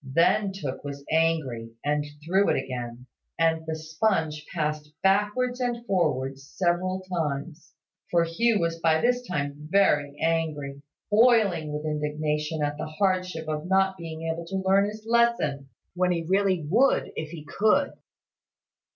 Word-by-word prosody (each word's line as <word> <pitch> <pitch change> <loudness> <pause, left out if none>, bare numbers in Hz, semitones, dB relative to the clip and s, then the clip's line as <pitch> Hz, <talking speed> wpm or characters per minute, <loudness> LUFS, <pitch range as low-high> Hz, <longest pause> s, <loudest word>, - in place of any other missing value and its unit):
Then 170 +9 +2
Tooke 145 -9 -5
was 140 -1 -7
angry, 160 -8 +1 0.2
and 150 0 +1 0.2
threw 190 +4 +3
it - - +3
again, 125 -2 -5 0.3
and 160 -1 +2
the 160 - -2
sponge 160 -1 -1
passed 150 -2 -2
backwards 210 +6 +2
and 240 -1 -2
forwards 135 - 0
several 185 +1 0
times: 165 -3 -4 0.3
for 170 -1 +3
Hugh 210 +7 +2
was 165 -1 -1
by 160 -1 +3
this 245 +4 +2
time 150 -8 -4
very 145 -7 +3
angry, 155 -4 -1 0.3
boiling 210 -9 +4
with 150 +1 -4
indignation 150 0 -1
at 145 0 -1
the - - -3
hardship 180 -1 -1
of 155 +2 -3
not 190 0 +3
being 165 -2 -7
able 165 +1 -3
to 190 +1 -3
learn 195 +1 +4
his 215 +1 -7
lesson, 230 -13 +2 0.2
when 180 0 +1
he 170 -2 -1
really 190 -3 +2
would 240 - +3
if 155 -1 -4
he 155 -2 -9
could. 220 - +2
165 Hz, 145 wpm, -26 LUFS, 150-195 Hz, 0.3 s, boiling